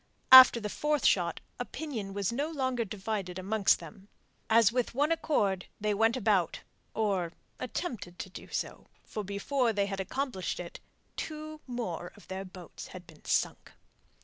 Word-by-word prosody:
After 260 -2 +11
the 215 - -3
fourth 300 +5 0
shot, 170 -3 +2 0.2
opinion 245 -6 -5
was 200 -1 0
no 285 +5 -1
longer 260 -6 -1
divided 195 -3 -4
amongst 195 +2 +2
them. 180 +5 -12 0.4
As 230 -1 +6
with 245 -1 -1
one 295 +4 +2
accord 210 - +1
they 210 0 +1
went 225 +4 +3
about, 200 -7 +1 0.3
or 195 -6 0 0.3
attempted 205 - -4
to - - -6
do - - -10
so, - - -4 0.2
for 215 - -5
before 230 +6 0
they 200 -1 +1
had 195 -1 -4
accomplished 240 -1 -3
it 175 -1 -7 0.4
two 310 0 -6
more 185 -9 -4
of 205 - -17
their 190 +1 -4
boats 185 -2 -10
had 180 -1 -10
been 160 -2 -17
sunk. - - 0
210 Hz, 155 wpm, -30 LUFS, 190-255 Hz, 0.4 s, After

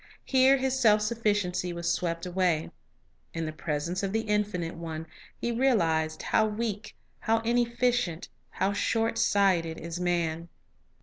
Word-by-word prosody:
Here 265 0 +5
his 265 0 -1
self 215 -4 +5
sufficiency 205 -5 0
was 170 0 -1
swept 170 -1 -2
away. 180 -3 0 0.6
In 165 0 -2
the 155 - -3
pres 150 -1 -3
ence 180 +2 -2
of 195 -1 -2
the 225 - +1
Infinite 210 -6 -1
One 160 -1 -6 0.3
he 235 - -1
realized 165 -11 +1
how 220 - +2
weak, 210 -1 -4 0.2
how 225 +1 +2
inefficient, 235 -5 0 0.2
how 195 +1 -1
short 225 +2 0
sighted, 180 -5 +2
is 170 +1 -6
man. 170 -2 -1
195 Hz, 140 wpm, -28 LUFS, 170-225 Hz, 0.6 s, Here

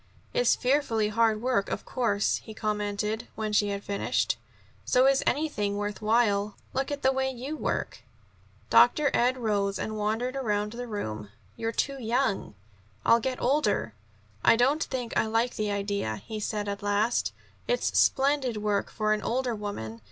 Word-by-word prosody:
"It's - - +3
fearfully 250 -5 +1
hard 220 0 +2
work, 245 -6 +1
of - - -4
course," 205 -5 +1
he 220 - -11
commented, 210 0 -2
when 215 -1 -3
she 205 0 +3
had 200 0 -3
finished. 200 0 0 0.5
"So 255 +1 +3
is 275 0 +4
anything 210 -10 0
worth 205 +1 -3
while. 210 -2 +2 0.2
Look 270 +1 -1
at 285 -1 -4
the 265 - +5
way 265 0 0
you 265 +4 -5
work!" - - -2 0.7
Dr. 295 -2 +5
Ed 250 +2 +3
rose 200 -4 0
and 215 - -3
wandered 225 +5 -1
around 210 -5 -1
the 245 +1 -6
room. 110 - -5 0.3
"You're 225 - -2
too 275 +4 -2
young." 230 - 0 0.5
"I'll 230 - +6
get 255 +2 -3
older." 250 - +1 0.5
"I - - +6
don't 270 +7 +3
think 250 -3 -4
I - - +2
like 225 +2 0
the 215 -1 -1
idea," 200 - -1
he 220 -2 -5
said 210 0 -2
at 200 0 -3
last. 205 +3 +1 0.4
"It's - - 0
splendid 270 -4 +3
work 210 -1 0
for 215 -1 0
an 215 - -1
older 250 0 -1
woman. 200 - -5
220 Hz, 165 wpm, -28 LUFS, 205-255 Hz, 0.7 s, I'll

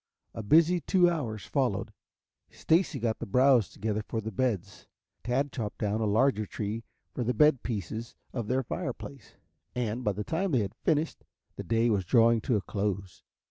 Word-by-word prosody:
A - - -5
busy 165 +10 +4
two 180 +3 +4
hours 110 - -4
followed. - - -1 0.6
Stacy 165 -2 +1
got 110 -1 -1
the - - -5
browse 125 0 +4
together 110 0 -2
for 110 +1 -4
the 110 0 -5
beds. 100 -4 -2 0.4
Tad 130 +4 0
chopped 110 -5 -4
down 105 +1 -1
a - - +1
larger 110 0 +2
tree 110 +2 -4 0.3
for 125 - -2
the 125 +2 -1
bed 150 -4 +5
pieces 110 +1 -5 0.2
of 115 -4 -3
their 130 +3 +1
fireplace, 140 - -6 0.4
and, 120 0 -2
by 105 - +1
the 105 +2 -4
time 170 - -1
they 125 - +4
had 100 - -3
finished, 155 0 -1 0.3
the - - -6
day 115 +1 +2
was 100 -3 +1
drawing 115 +3 +4
to 120 - 0
a 105 - +1
close. 100 -2 -3
115 Hz, 180 wpm, -29 LUFS, 105-135 Hz, 0.6 s, bed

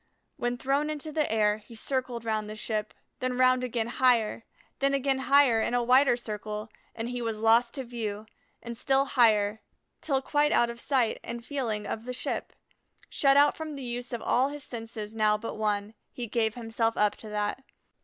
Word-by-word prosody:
When 245 0 -2
thrown 275 +4 0
into 305 0 -5
the 305 -4 0
air, 210 -1 +2
he 215 +2 -14
circled 245 -1 -3
round 215 -1 -1
the 215 - -6
ship, 215 -1 -3 0.2
then 255 -1 -2
round 255 0 +4
again 240 -2 -1
higher, 235 -2 +2 0.3
then 275 0 +2
again 270 -1 +1
higher 265 -4 +4
in 240 - 0
a 245 - +2
wider 255 +1 +5
circle, 215 -1 -5 0.3
and 225 0 -4
he 245 0 -4
was 225 -2 -2
lost 230 +3 +3
to 270 - -3
view; 220 -4 -4 0.4
and 235 0 -6
still 270 +3 +2
higher 220 -5 +3 0.4
till 275 -4 +1
quite 295 +1 +2
out 235 0 +3
of 235 0 -10
sight 255 -5 +1
and 235 0 -6
feeling 230 -8 -2
of 225 - -5
the 250 - -4
ship. - - -3 0.6
Shut 275 -1 +4
out 290 0 +5
from 315 -2 -6
the 275 - -7
use 245 +1 -5
of 240 -2 -4
all 260 +3 +2
his 290 -1 -7
senses 225 -3 -7
now 215 -1 +2
but 230 +2 -5
one, 210 -1 -1 0.2
he 245 - -5
gave 220 -1 0
himself 225 -1 -1
up 210 0 +2
to 220 - -10
that. 210 +5 -2
235 Hz, 195 wpm, -28 LUFS, 220-265 Hz, 0.6 s, wider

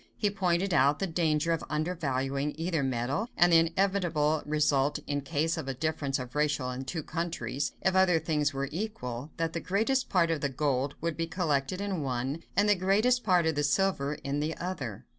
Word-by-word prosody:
He 205 -2 +1
pointed 185 -1 0
out 145 -1 +4
the 195 - -1
danger 165 -2 +1
of 165 - 0
undervaluing 145 -3 -1
either 165 -1 -1
metal, 130 - -1
and 175 0 +5
the 165 - +8
inevitable 165 -3 +1
result, 145 -2 +2
in 145 0 -1
case 160 +3 -1
of 155 -4 -4
a 135 - -3
difference 145 -1 -1
of 125 -2 -7
ratio 145 -3 0
in 130 +1 -5
two 160 +3 -4
countries, 155 -6 -3
"if 190 0 +2
other 190 -3 +5
things 150 -2 0
were 140 0 -2
equal, 145 - -4
that 165 0 -1
the 170 - -2
greatest 225 - 0
part 170 -3 +3
of 160 -3 -1
the 140 - 0
gold 140 0 -1
would 165 -1 -1
be 165 0 -1
collected 165 -1 -1
in 200 -4 -2
one, 135 +3 -2 0.2
and 205 +1 +4
the 205 - +6
greatest 210 +7 +2
part 180 -5 +3
of 160 - +2
the 145 - 0
silver 150 -2 +1
in 140 +1 -1
the 155 +2 -2
other." 145 - -5
160 Hz, 200 wpm, -29 LUFS, 140-180 Hz, 0.2 s, the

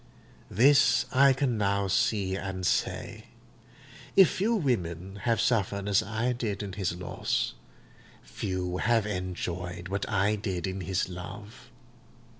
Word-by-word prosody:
This 140 +6 +5
I 135 +1 +6
can 130 -4 0
now 100 -1 +1
see 100 -2 +1
and 95 -1 -4
say: - - -1 0.9
if 190 -3 +7
few 220 +5 +1
women 95 - -2
have 115 -2 +2
suffered 100 -4 0
as 100 -1 +3
I 110 +4 -1
did 110 -4 -3
in 100 -2 -6
his 95 -3 -2
loss, 90 0 -2 0.7
few 90 -1 -3
have 115 +1 +2
enjoyed 90 -2 -4
what 100 0 -3
I 105 +1 +1
did 95 -4 -3
in 95 0 -4
his 95 0 -1
love. 95 +6 -9
100 Hz, 130 wpm, -28 LUFS, 95-115 Hz, 0.9 s, if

